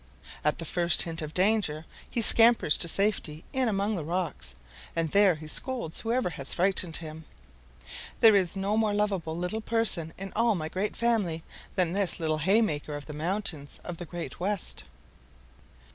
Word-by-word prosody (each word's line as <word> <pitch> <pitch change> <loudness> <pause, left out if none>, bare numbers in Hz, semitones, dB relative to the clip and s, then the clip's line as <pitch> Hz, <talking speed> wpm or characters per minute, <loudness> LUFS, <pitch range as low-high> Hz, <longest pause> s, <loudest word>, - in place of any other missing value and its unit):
At 150 - 0
the 165 - -5
first 170 0 +4
hint 165 -1 -5
of 155 -1 -6
danger 185 -6 +1 0.2
he 235 - 0
scampers 230 -8 +6
to 170 - +3
safety 170 -5 0
in 260 -2 0
among 205 +1 -1
the 170 - -4
rocks, 155 - -4 0.4
and 165 -1 -1
there 200 -3 +4
he 155 0 -11
scolds 235 -1 0
whoever 230 -4 -1
has 140 -3 -4
frightened 180 -2 0
him. 160 -1 -9 0.9
There 220 -2 +7
is 190 -1 +1
no 200 +2 -1
more 215 -2 +1
loveable 195 -6 -2
little 180 +6 -3
person 220 -8 +2
in 195 0 -8
all 230 -1 +2
my 155 -3 -4
great 195 +5 -3
family 205 -9 0 0.3
than 180 -2 +1
this 200 -2 +1
little 155 -1 -1
haymaker 160 -5 +1
of 145 - -8
the 150 - -9
mountains 160 -2 -1
of 175 -1 -7
the 175 - -6
Great 175 +1 -8
West." 195 +1 -3
180 Hz, 170 wpm, -27 LUFS, 160-210 Hz, 0.9 s, There